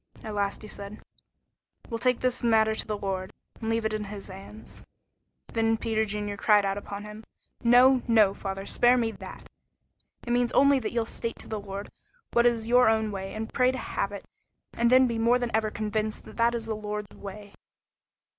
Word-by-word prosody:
At 215 - -5
last 200 0 -2
he - - -8
said, 200 0 -8 0.9
"We'll 230 -2 -4
take 250 0 +1
this 255 -1 0
matter 220 -2 +3
to - - -4
the 210 -1 -2
Lord, 190 -2 -3 0.3
and 225 - -3
leave 225 0 0
it 220 - 0
in 215 -1 -2
his 200 -1 -8
hands." 195 +3 -11 0.7
Then 225 0 +2
Peter 220 -1 0
Junior 205 -1 -4
cried 205 -1 +4
out 195 0 0
upon 200 0 -7
him: 210 +1 -9 0.4
"No, 250 +2 +6
no, 215 -4 +5
father; 195 0 -5
spare 245 +4 +4
me 230 -2 0
that. - - -10 0.8
It 240 0 +1
only 280 +1 +6
means 275 -2 +3
that 215 - -3
you'll 235 -1 0
state 230 0 -4
to - - -5
the 215 -1 -4
Lord 200 0 -7 0.4
what 235 0 +5
is 230 -2 0
your 245 0 +5
own 220 -1 +1
way, 195 0 -6
and 220 +1 -5
pray 255 0 +3
to 260 - -5
have 200 - -3
it, 200 - -8 0.5
and 235 0 +2
then 255 +1 +6
be 235 -2 -1
more 235 +2 +4
than 245 -2 -2
ever 220 -1 +1
convinced 215 0 -3
that 235 0 +1
it - - +1
is 225 - -6
the 220 -1 -3
Lord's 210 -1 -5
way." 200 0 -10
220 Hz, 200 wpm, -27 LUFS, 205-235 Hz, 0.9 s, No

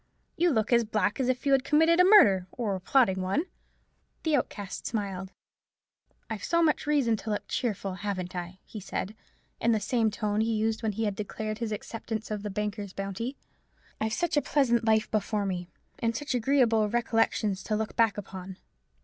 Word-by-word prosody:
You 345 +1 +3
look 225 -4 +1
as 235 0 +5
black 210 -1 0
as 255 -1 +1
if 255 +1 -1
you 280 - +2
had 270 -1 +4
committed 320 +4 +4
a - - +8
murder, 210 - +6
or 225 -5 -2
were 190 - -3
plotting 190 -3 +3
one." 195 - 0 0.8
The 315 -2 +2
Outcast 205 -7 -3
smiled. 195 -4 -3 1.0
"I've 220 -2 -5
so 335 0 +2
much 305 -1 +1
reason 275 -7 +3
to 220 - -7
look 210 - -2
cheerful, 200 -5 -2
haven't 185 -2 -4
I?" 175 +1 -5
he 215 - -8
said, 200 +1 -4 0.4
in 230 0 +3
the 220 - +2
same 220 +2 +1
tone 210 0 -1
he 225 0 +1
had 215 - +1
used 225 0 -1
when 220 -2 -1
he 225 +3 -2
had 205 -2 -1
declared 215 +1 -4
his 230 -2 -3
acceptance 220 +1 -5
of 210 -1 -2
the 210 - -4
banker's 205 -1 -4
bounty. 200 +7 -4 0.6
"I've 220 0 -1
such 345 +4 0
a 290 - +4
pleasant 240 -7 +2
life 220 -1 +2
before 210 -1 0
me, 180 -2 -3 0.3
and 230 -1 0
such 290 +3 -3
agreeable 235 -4 +3
recollections 225 -4 +1
to 215 - 0
look 220 0 -3
back 225 -4 +3
upon. 190 -2 -7
220 Hz, 190 wpm, -28 LUFS, 200-240 Hz, 1.0 s, a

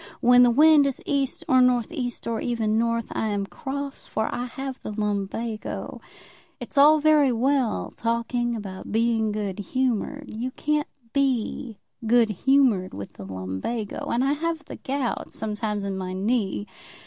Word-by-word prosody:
When 245 +1 +6
the 245 - +7
wind 295 +3 +6
is 270 - -2
east, 275 -2 0
or 255 0 +5
north 250 +1 +3
east, 250 -7 -4
or 230 -1 -2
even 225 -3 0
north, 230 0 +1
I 220 - -1
am 205 -2 -1
cross, 280 +5 -6
for 220 0 -2
I 245 - -2
have 265 +2 -6
the - - -6
lumbago. 210 +1 -3 0.6
It's - - -8
all 300 +2 +7
very 300 -3 +4
well 255 0 +1
talking 235 +1 -1
about 195 -3 -7
being 225 0 +2
good 205 -2 -3
humoured. 255 +6 -1
You 240 +4 -2
can't 300 0 0 0.3
be 260 -4 0 0.3
good 235 -1 +4
humoured 240 -4 +2
with 100 0 -7
the 100 - -10
lumbago. 95 - -4
And 240 +2 +1
I 275 +1 +2
have 325 +1 -3
the - - -8
gout 270 -2 -3
sometimes 210 -1 -2
in 195 -1 -3
my 185 0 -4
knee. 205 0 0
235 Hz, 160 wpm, -25 LUFS, 210-270 Hz, 0.6 s, the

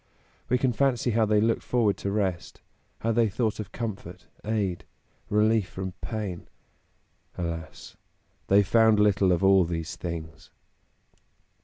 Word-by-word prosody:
We 125 - +3
can 125 -1 +1
fancy 125 -1 +1
how 110 0 +2
they 105 0 +3
looked 115 +2 +1
forward 115 -5 +1
to 100 - -3
rest; 95 -4 -2 0.4
how 115 - 0
they 115 -1 +2
thought 110 +2 -1
of 105 - -6
comfort, 115 -5 -6 0.2
aid, 105 -5 -2 0.5
relief 105 -1 +2
from 95 0 -5
pain. 105 -6 -5 0.9
Alas! 85 -2 -6 0.5
they 100 +1 +5
found 110 +1 +4
little 100 -2 +3
of 90 +1 +1
all 95 -1 +6
these 80 -1 -4
things. 80 -2 -7
105 Hz, 135 wpm, -26 LUFS, 90-110 Hz, 0.9 s, all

